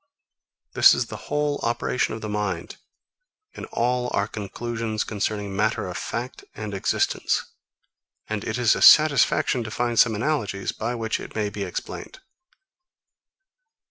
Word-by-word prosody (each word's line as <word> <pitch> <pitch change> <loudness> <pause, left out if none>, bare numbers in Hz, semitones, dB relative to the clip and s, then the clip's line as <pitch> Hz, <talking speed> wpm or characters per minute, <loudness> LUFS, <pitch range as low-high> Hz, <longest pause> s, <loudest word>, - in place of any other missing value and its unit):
This - - +7
is - - 0
the - - -10
whole 145 0 0
operation 120 -1 -1
of 110 - -8
the 110 - -4
mind, 105 -5 -3 0.8
in - - -7
all 125 +1 -1
our 100 - +1
conclusions 110 +1 -4
concerning 105 -1 -3
matter 110 -1 0
of 90 - -6
fact 120 +6 -5
and 105 -1 -6
existence; 95 - 0 0.8
and 110 -2 -3
it 110 - -3
is 120 -2 +4
a - - -4
satisfaction 140 -4 +6
to 110 - -6
find 120 +1 -1
some 115 -3 +5
analogies, 110 -6 -1
by 115 +2 -3
which 115 -2 -2
it - - -10
may 105 -2 -1
be 100 - -6
explained. 95 - -6
110 Hz, 140 wpm, -24 LUFS, 105-120 Hz, 0.8 s, This